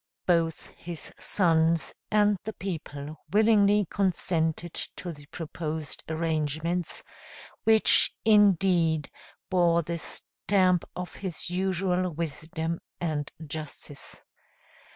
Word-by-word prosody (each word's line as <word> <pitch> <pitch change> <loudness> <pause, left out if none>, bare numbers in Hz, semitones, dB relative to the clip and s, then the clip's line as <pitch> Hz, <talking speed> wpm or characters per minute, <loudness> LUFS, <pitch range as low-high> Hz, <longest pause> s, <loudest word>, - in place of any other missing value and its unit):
Both 165 -3 +1
his 170 -2 -5
sons 165 -4 +2 0.2
and 210 -1 +4
the 220 - -5
people 155 -6 -6
willingly 210 -1 +4
consented 175 -4 0 0.2
to 175 - -5
the 145 -1 -14
proposed 155 -1 -4
arrangements, 160 +1 -1 0.6
which, 220 -1 +6
indeed, 185 -7 +4 0.4
bore 170 -2 +3
the 170 +1 -3
stamp 185 +1 0
of 180 0 -5
his 180 -2 -4
usual 185 0 0
wisdom 160 +1 -3 0.2
and 155 -4 -2
justice. 150 -2 -6
170 Hz, 90 wpm, -27 LUFS, 160-190 Hz, 0.6 s, which